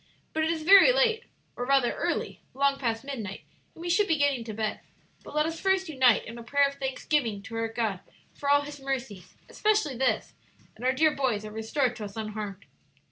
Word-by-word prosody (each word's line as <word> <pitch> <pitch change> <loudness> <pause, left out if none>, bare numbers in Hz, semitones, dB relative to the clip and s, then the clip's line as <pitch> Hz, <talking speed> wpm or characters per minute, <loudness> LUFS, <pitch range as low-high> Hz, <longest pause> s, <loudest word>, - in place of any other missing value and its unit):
"But 315 - 0
it 320 - +1
is 325 -1 -2
very 395 +7 +8
late, 480 -2 +2 0.3
or 245 - -4
rather 265 -1 +3
early - - -3
long 275 0 +2
past 230 -2 -1
midnight 230 -8 -6 0.3
and 330 - -10
we - - -4
should 395 +4 +3
be 325 - +2
getting 285 -4 +1
to 225 - -5
bed. 215 0 -2 0.4
But - - -11
let 300 0 +3
us 325 0 -4
first 380 -1 +1
unite 260 -6 +3
in 230 +1 -8
a - - -9
prayer 280 +4 +3
of 280 - -6
thanksgiving 265 -5 -1
to 225 - -8
our 225 0 0
God 225 -4 -2 0.3
for 280 - -4
all 285 0 +5
His 290 0 -8
mercies, 265 -8 -5
especially 425 -10 +1
this 240 -3 0 0.4
that 225 - -12
our 255 - +3
dear 310 +3 +4
boys 245 -6 -1
are 215 - -7
restored 240 +4 -1
to 215 - -5
us 200 +1 -10
unharmed." 215 -2 -5
265 Hz, 210 wpm, -27 LUFS, 225-305 Hz, 0.4 s, very